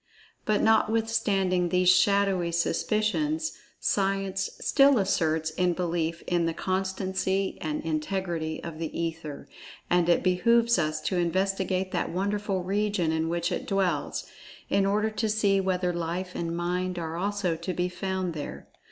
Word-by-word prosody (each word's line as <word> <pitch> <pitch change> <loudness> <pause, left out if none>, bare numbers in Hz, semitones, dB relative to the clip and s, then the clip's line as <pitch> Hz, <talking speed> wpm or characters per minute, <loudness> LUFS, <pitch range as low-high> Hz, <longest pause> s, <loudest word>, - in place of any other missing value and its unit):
But, 215 -1 +2
notwithstanding 215 -5 +2
these 180 +1 +2
shadowy 185 -1 +4
suspicions, 230 - 0 0.3
Science 195 -1 0
still 275 -1 +5
asserts 160 -5 +1
in 180 +2 +1
belief 170 -1 -2
in 175 -1 +1
the 165 - -2
constancy 190 0 -1
and 155 -2 -3
integrity 165 0 -2
of 165 -2 -7
The 165 -2 -2
Ether, 165 -3 -4 0.4
and 175 -1 +3
it 175 - +3
behooves 235 +4 +3
us 155 -1 -1
to 185 - -1
investigate 190 +1 0
that - - -1
wonderful 200 0 -1
region 200 -3 0
in 160 0 0
which 170 0 -1
it - - -3
dwells, 195 -2 0 0.5
in 195 0 +3
order 210 +2 +1
to 215 +1 -1
see 205 -2 +2
whether 180 -1 0
Life 175 +2 -3
and 170 0 -3
Mind 180 +1 -1
are 165 -1 -4
also 195 -1 -1
to 185 - -4
be 180 0 -1
found 185 -1 -3
there. 150 -2 -7
185 Hz, 145 wpm, -27 LUFS, 170-200 Hz, 0.5 s, still